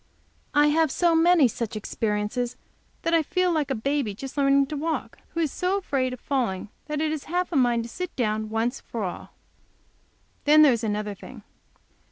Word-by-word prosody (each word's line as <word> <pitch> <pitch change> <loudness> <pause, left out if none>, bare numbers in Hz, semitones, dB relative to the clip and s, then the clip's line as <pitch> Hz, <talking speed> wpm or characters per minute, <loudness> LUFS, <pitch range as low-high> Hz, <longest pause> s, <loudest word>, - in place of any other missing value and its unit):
I 295 0 +5
have 320 +1 +3
so 340 +4 +2
many 330 -3 +5
such 230 -1 -4
experiences 215 +3 -2 0.5
that 330 - 0
I 330 - +5
feel 360 +3 +1
like 310 -4 0
a 270 - 0
baby 260 -2 -1
just 270 +5 -8
learning 275 -1 +4
to 300 - -6
walk, 315 +3 -3 0.2
who - - -1
is 310 -4 0
so 365 +2 0
afraid 275 -9 -1
of 250 - -7
falling 235 -10 -2 0.2
that 300 -1 -2
it 310 0 0
has 310 -2 -4
half 360 +3 -1
a - - -3
mind 240 -3 +3
to 235 - -8
sit 360 +7 -6
down 215 -3 -1
once 225 +4 -1
for 230 -3 -5
all. 180 - -6 1.1
Then 305 +1 +7
there 280 -4 +6
is 230 0 -3
another 210 -1 -2
thing. 200 - -12
275 Hz, 195 wpm, -25 LUFS, 230-315 Hz, 1.1 s, Then